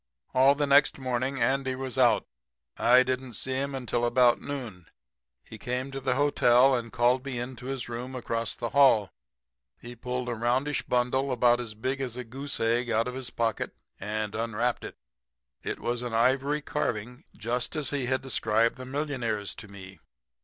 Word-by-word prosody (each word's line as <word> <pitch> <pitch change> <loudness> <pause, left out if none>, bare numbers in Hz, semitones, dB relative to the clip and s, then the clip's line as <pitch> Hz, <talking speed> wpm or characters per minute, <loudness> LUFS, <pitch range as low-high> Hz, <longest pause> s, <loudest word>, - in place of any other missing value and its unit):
"All 135 +2 +5
the 145 0 +1
next 140 0 +4
morning 130 +1 -2
Andy 135 0 +1
was 130 -2 -5
out. 125 -3 +4 0.5
I 125 +2 +5
didn't 130 -2 -3
see 130 - -2
him 135 +1 -2
until 120 -2 -2
about 120 0 +4
noon. 115 -11 -6 0.6
He 110 - -12
came 125 +4 -3
to 135 - -4
the 130 -1 0
hotel 135 -2 +4
and 115 -2 -2
called 125 +2 +2
me 135 -3 -4
into 125 +1 -6
his 135 -2 -4
room 125 +2 -6
across 115 -3 -3
the 120 - -4
hall. 120 -8 +4 0.7
He 120 0 -10
pulled 125 +1 -4
a 120 - -1
roundish 125 +6 0
bundle 125 +2 +1
about 120 -1 +3
as 110 -3 -7
big 130 +5 -2
as 125 -2 -4
a 125 - -4
goose 135 +5 -4
egg 120 +2 +1
out 115 +1 +1
of 125 - -4
his 130 -1 -5
pocket 115 -1 -2 0.2
and 105 0 -3
unwrapped 115 +2 -1
it. - - -8 0.6
It - - -4
was 120 0 -2
an 120 -2 -3
ivory 135 +5 +2
carving 125 -1 -3
just 120 +6 -2
as 150 -2 -2
he 140 -4 -1
had 130 +1 0
described 115 -1 +1
the 130 0 -8
millionaire's 130 -7 -2
to 105 - -10
me. 95 -2 -12
125 Hz, 180 wpm, -28 LUFS, 115-135 Hz, 0.7 s, All